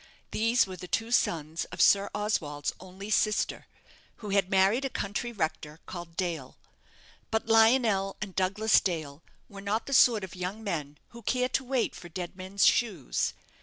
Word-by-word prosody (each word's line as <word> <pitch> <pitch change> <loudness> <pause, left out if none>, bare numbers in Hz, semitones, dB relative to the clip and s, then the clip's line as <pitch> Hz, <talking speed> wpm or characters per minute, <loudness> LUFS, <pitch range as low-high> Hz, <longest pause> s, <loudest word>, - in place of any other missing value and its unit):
These 230 +2 +3
were 185 -1 -8
the 180 +1 -8
two 225 +5 -1
sons 160 -7 0
of - - -11
Sir 200 0 +5
Oswald's 155 -9 -1
only 190 +3 -9
sister, 215 0 +1 0.5
who 210 - -8
had 195 -2 +2
married 195 +7 +3
a 270 - -1
country 215 +1 -3
rector, 160 -6 -3
called 175 -2 -8
Dale. 165 -8 -3 0.7
But 220 0 0
Lionel 225 -3 +4
and 200 -3 -6
Douglas 200 +4 +3
Dale 155 -5 -3 0.3
were 200 -1 -10
not 205 +3 -1
the 275 - -4
sort 235 -5 +5
of 190 - -7
young 185 +4 -5
men 150 -7 -4
who 235 - -12
care 250 +3 0
to 265 - 0
wait 255 -2 0
for 175 - -10
dead 175 +1 -6
men's 190 +1 0
shoes. 195 - +1
195 Hz, 165 wpm, -29 LUFS, 175-220 Hz, 0.7 s, Sir